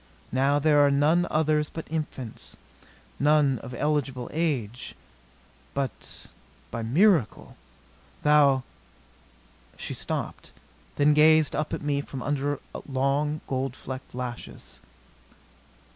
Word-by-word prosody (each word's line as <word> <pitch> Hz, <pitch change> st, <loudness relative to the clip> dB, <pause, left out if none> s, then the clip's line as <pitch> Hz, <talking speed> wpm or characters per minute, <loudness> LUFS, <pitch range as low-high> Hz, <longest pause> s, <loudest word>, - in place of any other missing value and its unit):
Now 135 Hz, +3 st, +2 dB
there 145 Hz, 0 st, +4 dB
are 145 Hz, -, +5 dB
none 150 Hz, +5 st, +3 dB
others 155 Hz, -1 st, +1 dB
but 165 Hz, -, -7 dB
infants, 150 Hz, -7 st, -5 dB, 0.6 s
none 145 Hz, -3 st, +3 dB
of 125 Hz, +1 st, -8 dB
eligible 135 Hz, -4 st, -1 dB
age. 130 Hz, -8 st, -2 dB, 0.8 s
But 135 Hz, -6 st, -4 dB, 0.5 s
by 115 Hz, -, -4 dB
a -, -, -3 dB
miracle 155 Hz, -, +2 dB, 0.7 s
thou 145 Hz, -3 st, +5 dB, 0.5 s
" -, -, -30 dB
She -, -, -5 dB
stopped; -, -, -4 dB, 0.4 s
then 150 Hz, +1 st, +4 dB
gazed 155 Hz, 0 st, +5 dB
up 150 Hz, 0 st, -2 dB
at -, -, -3 dB
me 145 Hz, -1 st, 0 dB
from 135 Hz, -3 st, -7 dB
under 145 Hz, 0 st, -1 dB, 0.3 s
long, 140 Hz, +3 st, 0 dB
gold 130 Hz, -1 st, -2 dB
flecked 130 Hz, -1 st, -8 dB
lashes. 125 Hz, -1 st, -7 dB
145 Hz, 115 wpm, -26 LUFS, 130-150 Hz, 0.8 s, are